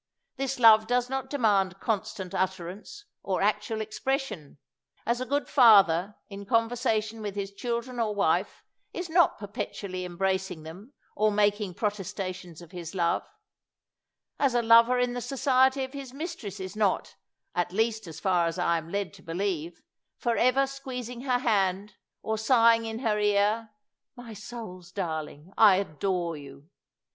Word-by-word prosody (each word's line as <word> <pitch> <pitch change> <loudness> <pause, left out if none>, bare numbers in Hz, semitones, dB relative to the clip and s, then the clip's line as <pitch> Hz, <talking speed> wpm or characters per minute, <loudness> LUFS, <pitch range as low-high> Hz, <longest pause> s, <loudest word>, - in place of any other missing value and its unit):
This 270 0 -2
love 220 -2 +7
does 245 +1 0
not 265 -1 -3
demand 200 -9 +1
constant 205 -4 -3
utter 190 -2 -1
ance 220 - -10 0.2
or 190 -1 -1
actual 210 +1 0
expression, 220 - -3 0.5
as 235 +2 0
a 255 - -3
good 285 -2 0
father, 205 - +5
in 200 0 -8
conversation 225 -1 0
with 205 -2 -5
his 200 -1 -4
children 235 +3 -4
or 215 -2 0
wife, 185 -1 0 0.3
is 355 -2 -5
not 345 +1 +4
perpetually 200 -3 -5
embracing 190 -1 -2
them 190 - -11 0.2
or 215 +1 +3
making 205 -2 +1
protesta 200 -2 -3
tions 175 -2 -12
of 170 - -15
his 175 -1 -8
love; 170 -2 0 1.1
as 270 -4 +2
a 240 - +2
lover 230 +2 +6
in 245 0 +1
the 245 - -4
society 265 0 +2
of 260 +1 -7
his 270 -2 -8
mistress 280 - -6
is 190 +2 -6
not, 210 -3 0 0.4
at 175 0 -1
least 220 0 0
as 160 -1 -8
far 180 -3 +2
as 165 - -3
I 170 -2 +1
am 160 +1 -11
led 200 +1 -3
to 195 - -15
believe, 175 -1 -3 0.3
for 235 -1 0
ever 255 +3 +3
squeezing 250 -3 -7
her 250 -2 +2
hand 200 -4 0 0.3
or 220 0 -2
sighing 230 0 +4
in 225 0 -4
her 210 -1 +2
ear, 210 +2 +2 0.5
My 245 -3 -10
soul's 200 -5 -9
darling, 160 -2 -5
I 210 -4 +8
adore 180 -1 -2
you!" 140 +3 -13
210 Hz, 155 wpm, -27 LUFS, 185-240 Hz, 1.1 s, I